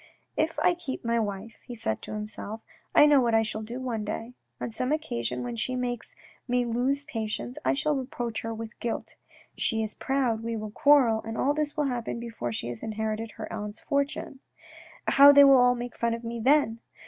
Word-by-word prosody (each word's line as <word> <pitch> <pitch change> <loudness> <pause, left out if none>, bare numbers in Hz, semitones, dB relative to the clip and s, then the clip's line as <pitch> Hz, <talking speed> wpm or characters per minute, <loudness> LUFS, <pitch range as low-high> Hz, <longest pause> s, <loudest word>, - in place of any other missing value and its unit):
" - - -46
If 325 - -12
I 355 - +3
keep 290 -8 -6
my 235 0 +2
wife," 205 0 -4
he 245 - -8
said 110 - -2
to - - -7
himself, 210 +1 -3 0.2
" - - -33
I - - +8
know 290 -2 +6
what 235 -2 +2
I 225 - +4
shall 215 0 -3
do 235 +4 -6
one 240 -4 -3
day; 225 +3 -5 0.3
on - - -4
some 255 +4 -2
occasion 125 - -2
when 120 -1 -4
she 255 - -1
makes 245 -1 -4 0.3
me 245 0 +1
lose 250 +4 0
patience, 215 - -4
I 130 +1 +2
shall 300 - +1
reproach 245 -4 -3
her 225 - -4
with 225 0 -6
her - - -27
guilt. 235 - -4 0.4
She 225 -1 +2
is 215 - +1
proud, 260 -5 0
we 230 0 -3
shall 215 -1 -5
quarrel, 250 -4 +4
and 225 +1 -6
all 285 - +2
this 300 0 -1
will 300 - +2
happen 245 -4 -2
before 225 - -5
she 115 - -4
has 120 -2 -7
inherited 220 0 -3
her - - -7
aunt's 210 -1 -5
fortune. 280 -1 -2 0.7
And - - +1
how 280 +1 +11
they 285 0 +8
will 275 -1 +8
all 245 0 +5
make 245 0 -6
fun 235 0 0
of 230 - -9
me 235 0 -4
then 250 -2 +3
230 Hz, 220 wpm, -27 LUFS, 220-260 Hz, 0.7 s, how